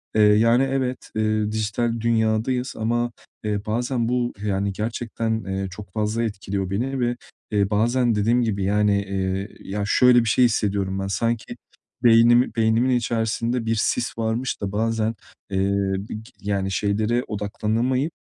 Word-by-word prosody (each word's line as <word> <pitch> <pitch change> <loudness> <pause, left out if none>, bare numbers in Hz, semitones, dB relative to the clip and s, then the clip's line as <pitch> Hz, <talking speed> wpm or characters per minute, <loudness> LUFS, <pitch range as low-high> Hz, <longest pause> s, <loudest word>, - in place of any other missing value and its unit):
Eee, 110 - +4
yani, 115 +4 +5
evet, 135 -2 -2
eee, 110 -1 0
dijital 110 +2 -1
dünyadayız 115 +3 0
ama, 120 +2 0 0.3
eee, 105 -1 -2
bazen 120 +2 -1
bu, 125 -1 0
yani 100 0 0
gerçekten, 110 +1 -2
eee, 95 0 -2
çok 95 0 -10
fazla 110 +2 -1
etkiliyor 100 -3 -3
beni 130 +7 -2
ve, 120 0 0 0.4
eee, 100 -2 +2
bazen 120 +3 +2
dediğim 115 +4 +2
gibi, 105 -4 -1
yani, 100 0 +2
eee, 95 0 -2
ya 100 +1 -4
şöyle 125 +3 +5
bir 115 - 0
şey 125 - +4
hissediyorum 100 -4 0
ben: 95 - -2
Sanki 115 +3 -2 0.5
beynimi 120 0 +5
beynimin 115 +2 +2
içerisinde 115 0 -1
bir 115 0 +1
sis 120 +3 -1
varmış 115 +3 -2
da 100 -1 -2
bazen, 110 +1 0 0.4
eee, 95 0 +1 0.4
bi 110 - -5 0.2
yani, 100 -1 -1
şeylere 105 +5 0
odaklanamayıp, 110 +7 -1
110 Hz, 145 wpm, -23 LUFS, 105-120 Hz, 0.5 s, yani